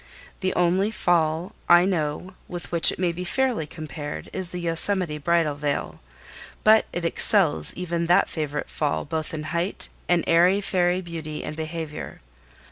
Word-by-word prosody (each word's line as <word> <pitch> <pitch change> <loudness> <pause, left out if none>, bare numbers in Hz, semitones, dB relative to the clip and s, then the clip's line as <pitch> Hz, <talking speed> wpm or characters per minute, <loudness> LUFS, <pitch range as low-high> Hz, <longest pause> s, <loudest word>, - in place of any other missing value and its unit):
The 185 -1 -1
only 180 +3 +2
fall 170 -2 0 0.2
I 175 +1 +7
know 175 0 -2
with 175 -1 -7
which 170 -2 +4
it - - -7
may 175 -2 0
fairly 245 -3 0
be - - -15
compared 150 -2 -6
is 185 -2 -4
the 180 - -6
Yosemite 170 -1 +1
Bridal 165 0 +2
Veil; 145 0 -3 0.6
but 220 0 +5
it 175 -1 -3
excels 180 -1 +3
even 170 -1 -2
that 180 +3 +4
favorite 150 -2 -3
fall 150 -2 -2
both 155 +1 -3
in 155 -1 -4
height 170 +4 -1 0.2
and 175 -1 +3
airy 175 +4 +4
fairy 180 -2 +1
beauty 160 -3 -6
and 150 - -5
behavior. 160 -1 -6
170 Hz, 155 wpm, -24 LUFS, 155-180 Hz, 0.6 s, I